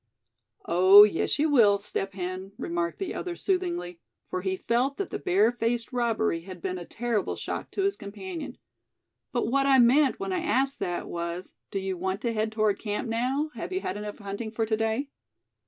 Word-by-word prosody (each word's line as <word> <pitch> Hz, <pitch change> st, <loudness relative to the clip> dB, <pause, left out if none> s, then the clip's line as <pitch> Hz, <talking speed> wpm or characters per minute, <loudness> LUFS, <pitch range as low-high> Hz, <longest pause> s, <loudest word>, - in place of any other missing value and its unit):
"Oh! 185 Hz, +4 st, +8 dB
yes 210 Hz, -6 st, +1 dB
you 300 Hz, +2 st, +3 dB
will, 215 Hz, -7 st, +6 dB
Step 195 Hz, -1 st, -4 dB
Hen," 185 Hz, +1 st, -5 dB
remarked 170 Hz, 0 st, -2 dB
the 385 Hz, -, -3 dB
other, 355 Hz, -1 st, -4 dB
soothingly, 350 Hz, -, -2 dB, 0.3 s
for 185 Hz, -, -2 dB
he 190 Hz, 0 st, -1 dB
felt 250 Hz, +7 st, 0 dB
that 395 Hz, -, -3 dB
the -, -, -3 dB
bare 205 Hz, +6 st, +3 dB
faced 235 Hz, 0 st, -2 dB
robbery 225 Hz, -7 st, +1 dB
had 185 Hz, +1 st, -9 dB
been 185 Hz, +1 st, -3 dB
a 175 Hz, -, -8 dB
terrible 230 Hz, -1 st, -2 dB
shock -, -, -5 dB
to 390 Hz, -, -2 dB
his 395 Hz, 0 st, +1 dB
companion. 290 Hz, -, -7 dB, 0.7 s
"But 240 Hz, -, 0 dB
what 275 Hz, +1 st, +3 dB
I 270 Hz, -1 st, +6 dB
meant 260 Hz, +6 st, +5 dB
when 390 Hz, -1 st, -2 dB
I 365 Hz, -, 0 dB
asked 275 Hz, -5 st, 0 dB
that, 175 Hz, -1 st, -3 dB
was, 170 Hz, +1 st, -5 dB, 0.2 s
do -, -, -4 dB
you 190 Hz, -1 st, -2 dB
want 190 Hz, +2 st, -2 dB
to 235 Hz, -1 st, -1 dB
head 215 Hz, 0 st, -1 dB
toward 215 Hz, -2 st, +1 dB
camp 210 Hz, +1 st, -3 dB
now; 260 Hz, +7 st, 0 dB
have 235 Hz, +9 st, -6 dB
you 375 Hz, +1 st, -1 dB
had 185 Hz, -, -3 dB
enough 210 Hz, 0 st, -6 dB
hunting 200 Hz, +2 st, -5 dB
for 225 Hz, +1 st, -1 dB
to 220 Hz, 0 st, +1 dB
day?" 225 Hz, +5 st, -1 dB
220 Hz, 195 wpm, -27 LUFS, 190-270 Hz, 0.7 s, Oh